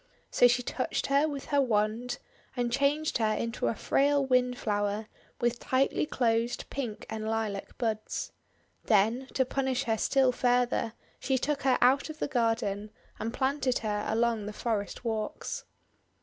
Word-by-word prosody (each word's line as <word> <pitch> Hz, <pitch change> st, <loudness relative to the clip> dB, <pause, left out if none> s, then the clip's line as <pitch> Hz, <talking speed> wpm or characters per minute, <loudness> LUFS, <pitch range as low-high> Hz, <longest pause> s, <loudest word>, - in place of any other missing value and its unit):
So 245 Hz, -, +6 dB
she 245 Hz, +1 st, +2 dB
touched 255 Hz, -, -2 dB
her 280 Hz, +2 st, +3 dB
with 285 Hz, -3 st, -5 dB
her 285 Hz, -, +5 dB
wand, 225 Hz, 0 st, 0 dB, 0.4 s
and 240 Hz, -1 st, 0 dB
changed 280 Hz, +3 st, +1 dB
her 215 Hz, -1 st, +2 dB
into 230 Hz, 0 st, -2 dB
a -, -, 0 dB
frail 280 Hz, +3 st, +2 dB
Windflower 220 Hz, -5 st, +1 dB, 0.3 s
with 240 Hz, 0 st, 0 dB
tightly 270 Hz, +3 st, +1 dB
closed 235 Hz, -2 st, 0 dB
pink 245 Hz, -6 st, -4 dB
and 220 Hz, 0 st, -4 dB
lilac 220 Hz, -3 st, -3 dB
buds. 220 Hz, -3 st, -2 dB, 0.5 s
Then, 225 Hz, +5 st, +3 dB
to 260 Hz, -, +3 dB
punish 265 Hz, 0 st, -1 dB
her 225 Hz, -3 st, 0 dB
still 265 Hz, -2 st, +3 dB
further, 245 Hz, -2 st, +1 dB, 0.3 s
she 265 Hz, -1 st, +1 dB
took 285 Hz, +2 st, -1 dB
her 260 Hz, -1 st, +3 dB
out 265 Hz, +5 st, +4 dB
of 310 Hz, -, -7 dB
the -, -, -1 dB
garden, 225 Hz, -5 st, 0 dB, 0.3 s
and 225 Hz, +2 st, -2 dB
planted 265 Hz, 0 st, 0 dB
her 210 Hz, -1 st, -1 dB
along 225 Hz, -1 st, +1 dB
the 210 Hz, -, -5 dB
forest 215 Hz, 0 st, -3 dB
walks. 225 Hz, -, -3 dB
245 Hz, 150 wpm, -29 LUFS, 220-265 Hz, 0.5 s, So